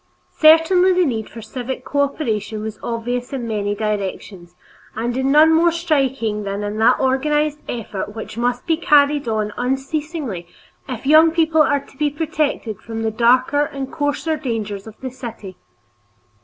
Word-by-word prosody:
Certainly 330 Hz, +4 st, +6 dB
the 365 Hz, 0 st, +3 dB
need 225 Hz, -6 st, -2 dB
for 230 Hz, -, -10 dB
civic 255 Hz, +3 st, -6 dB
cooperation 225 Hz, -7 st, -1 dB
was 220 Hz, -1 st, -6 dB
obvious 245 Hz, +2 st, -3 dB
in 245 Hz, -3 st, -3 dB
many 205 Hz, -2 st, -1 dB
directions, 195 Hz, -4 st, -4 dB, 0.4 s
and 235 Hz, +2 st, -2 dB
in 265 Hz, +1 st, +1 dB
none 310 Hz, +2 st, +6 dB
more 335 Hz, +1 st, +4 dB
strikingly 270 Hz, -10 st, 0 dB
than 200 Hz, +1 st, -3 dB
in 205 Hz, +1 st, -4 dB
that 220 Hz, -, +4 dB
organized 295 Hz, +3 st, +1 dB
effort 210 Hz, -3 st, -5 dB
which 220 Hz, -, -7 dB
must 245 Hz, +1 st, -1 dB
be 325 Hz, -2 st, +1 dB
carried 290 Hz, -4 st, +3 dB
on 215 Hz, -2 st, -1 dB
unceasingly 270 Hz, -, -3 dB, 0.4 s
if 250 Hz, 0 st, -6 dB
young 310 Hz, +3 st, +7 dB
people 320 Hz, -1 st, +2 dB
are 285 Hz, -1 st, +2 dB
to -, -, -20 dB
be 295 Hz, +1 st, +1 dB
protected 295 Hz, -, -2 dB
from 225 Hz, -1 st, -5 dB
the 220 Hz, -, 0 dB
darker 255 Hz, +6 st, +3 dB
and 275 Hz, -2 st, -6 dB
coarser 290 Hz, +2 st, -1 dB
dangers 220 Hz, -7 st, -4 dB
of 220 Hz, -, -12 dB
the 260 Hz, -1 st, -5 dB
city. 230 Hz, -7 st, -8 dB
260 Hz, 155 wpm, -20 LUFS, 220-300 Hz, 0.4 s, young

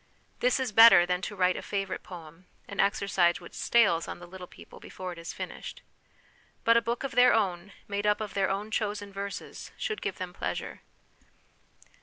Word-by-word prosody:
This 250 Hz, +1 st, +2 dB
is 260 Hz, -3 st, -2 dB
better 210 Hz, -5 st, +8 dB
than 180 Hz, 0 st, -1 dB
to 205 Hz, -, -5 dB
write 185 Hz, -1 st, +2 dB
a -, -, -5 dB
favourite 195 Hz, -1 st, -3 dB
poem, 170 Hz, 0 st, -12 dB, 0.2 s
an 200 Hz, -, -9 dB
exercise 195 Hz, -3 st, +2 dB
which 175 Hz, -, -13 dB
stales 205 Hz, -8 st, +2 dB
on -, -, -6 dB
the 175 Hz, -, -11 dB
little 180 Hz, 0 st, -10 dB
people -, -, -14 dB
before 185 Hz, -1 st, -7 dB
it 170 Hz, -, -12 dB
is 165 Hz, -, -6 dB
finished. -, -, -8 dB, 0.8 s
But 230 Hz, -, +5 dB
a 235 Hz, -, +5 dB
book 235 Hz, +3 st, -3 dB
of 275 Hz, -, -3 dB
their 250 Hz, +1 st, +5 dB
own, 190 Hz, -3 st, -1 dB, 0.2 s
made 205 Hz, +1 st, -2 dB
up 210 Hz, -, +2 dB
of 215 Hz, -2 st, -5 dB
their 195 Hz, -1 st, +1 dB
own 200 Hz, +3 st, -3 dB
chosen 205 Hz, -2 st, -3 dB
verses, 200 Hz, 0 st, -7 dB
should 435 Hz, -4 st, -3 dB
give -, -, -3 dB
them -, -, -6 dB
pleasure. -, -, -5 dB
200 Hz, 190 wpm, -28 LUFS, 180-220 Hz, 0.8 s, better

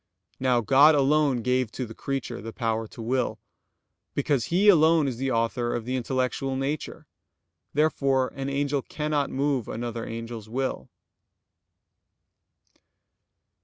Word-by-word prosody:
Now 125 Hz, -2 st, +2 dB
God 140 Hz, +7 st, +6 dB
alone 140 Hz, -3 st, +2 dB
gave 125 Hz, -2 st, +1 dB
to 130 Hz, -, -3 dB
the 115 Hz, -, -9 dB
creature 135 Hz, -3 st, -4 dB
the 115 Hz, +1 st, -6 dB
power 115 Hz, -2 st, -2 dB
to 115 Hz, -, -9 dB
will, 125 Hz, +3 st, -1 dB, 0.8 s
because 135 Hz, -5 st, +1 dB
He 190 Hz, +5 st, +2 dB
alone 160 Hz, -5 st, +6 dB
is 125 Hz, -3 st, -3 dB
the 135 Hz, +2 st, -1 dB
author 120 Hz, 0 st, 0 dB
of 115 Hz, -, -4 dB
the 130 Hz, +1 st, -2 dB
intellectual 130 Hz, +1 st, -1 dB
nature. 140 Hz, +3 st, -3 dB, 0.7 s
Therefore 140 Hz, -4 st, +2 dB
an 135 Hz, 0 st, -3 dB
angel 140 Hz, 0 st, 0 dB
cannot 150 Hz, 0 st, -2 dB
move 135 Hz, -3 st, -1 dB
another 115 Hz, 0 st, -4 dB
angel's 115 Hz, -1 st, -7 dB
will. 130 Hz, -, -3 dB
130 Hz, 130 wpm, -26 LUFS, 120-140 Hz, 0.8 s, God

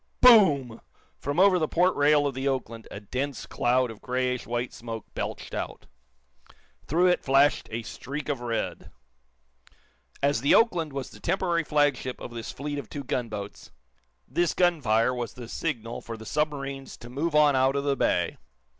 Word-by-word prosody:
Boom! 150 Hz, -, +6 dB, 0.4 s
From 145 Hz, +4 st, -2 dB
over 190 Hz, -1 st, +6 dB
the 155 Hz, -, +1 dB
port 180 Hz, +4 st, +2 dB
rail 145 Hz, 0 st, +4 dB
of 140 Hz, -, 0 dB
the 135 Hz, +2 st, -3 dB
"Oakland" 115 Hz, -4 st, -3 dB
a -, -, -7 dB
dense 130 Hz, +6 st, -4 dB
cloud 125 Hz, 0 st, +1 dB
of 110 Hz, -, -13 dB
grayish 125 Hz, -2 st, -1 dB
white 120 Hz, +2 st, -2 dB
smoke 115 Hz, -2 st, -7 dB
belched -, -, -5 dB
out. -, -, -5 dB, 1.0 s
Through 170 Hz, +5 st, +3 dB
it 180 Hz, -1 st, +3 dB
flashed 135 Hz, 0 st, +3 dB
a 115 Hz, +1 st, -3 dB
streak 140 Hz, +6 st, -6 dB
of 140 Hz, -4 st, -2 dB
red. 115 Hz, -1 st, -3 dB, 1.3 s
As 140 Hz, -4 st, +2 dB
the 140 Hz, -, +5 dB
"Oakland" 175 Hz, -9 st, +3 dB
was 135 Hz, -1 st, -5 dB
the -, -, -13 dB
temporary 175 Hz, -2 st, 0 dB
flagship 145 Hz, -4 st, +1 dB
of -, -, -8 dB
this 115 Hz, -1 st, -5 dB
fleet 145 Hz, +1 st, -4 dB
of 125 Hz, -, -9 dB
two 140 Hz, -, -6 dB
gunboats, 110 Hz, -6 st, -4 dB, 0.6 s
this 170 Hz, +6 st, 0 dB
gunfire 130 Hz, -10 st, +2 dB
was 120 Hz, -3 st, -4 dB
the 120 Hz, -2 st, -8 dB
signal 120 Hz, -5 st, -4 dB
for 115 Hz, -1 st, -7 dB
the 110 Hz, -, -11 dB
submarines 140 Hz, -1 st, -3 dB
to 120 Hz, -, -11 dB
move 150 Hz, +6 st, -2 dB
on 150 Hz, -2 st, +5 dB
out 130 Hz, +1 st, +3 dB
of 140 Hz, -, 0 dB
the 140 Hz, -1 st, +1 dB
bay. -, -, 0 dB
135 Hz, 170 wpm, -27 LUFS, 120-150 Hz, 1.3 s, Boom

